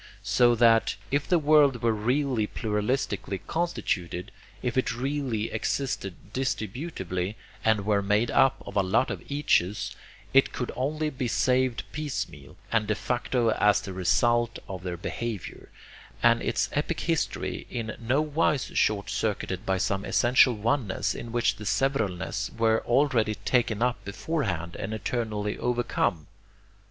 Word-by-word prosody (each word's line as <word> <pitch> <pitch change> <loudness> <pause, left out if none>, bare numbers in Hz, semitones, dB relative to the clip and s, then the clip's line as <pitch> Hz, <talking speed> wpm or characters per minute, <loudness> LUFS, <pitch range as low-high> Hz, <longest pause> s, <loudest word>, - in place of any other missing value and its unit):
So 120 -1 +4
that, 115 -1 +4 0.2
if 140 +1 +1
the 180 - +4
world 145 -5 +4
were 115 -1 +3
really 125 +1 0
pluralistically 105 -3 -2
constituted, 100 - -2 0.3
if 125 -2 -1
it 130 -2 +1
really 130 -4 -2
existed 110 -9 -2 0.2
distributively 110 - -3 0.3
and 110 -3 +2
were 105 -1 +2
made 105 +4 +1
up 135 - +3
of - - -8
a 100 - +4
lot 100 +7 +1
of - - -5
eaches, 105 -9 +1 0.4
it 135 0 +5
could 125 - -3
only 150 +4 -1
be 130 -2 -3
saved 130 0 +1
piecemeal 85 - -5
and 110 -2 +2
de 105 - +1
facto 120 0 0
as 105 0 +4
the 100 -2 -7
result 115 +6 +2
of 95 -2 -6
their 90 -1 -4
behavior, 110 +2 -5 0.5
and 115 0 +5
its - - 0
epic 150 +3 -1
history 165 -3 -2
in 115 -2 -4
no 130 +6 +1
wise 150 -2 0
short 100 -2 +1
circuited 100 -2 -2
by 95 0 +2
some 95 +1 0
essential 125 +2 +4
oneness 110 0 0
in 115 - -7
which 120 0 +1
the 110 - -8
severalness 110 -6 0
were 110 -1 +3
already 120 -4 +2
'taken 115 -2 +1
up' 125 -1 0
beforehand 100 - -3
and 105 +2 -4
eternally 110 -2 -2
'overcome'? 120 -10 0
115 Hz, 140 wpm, -27 LUFS, 105-130 Hz, 0.5 s, it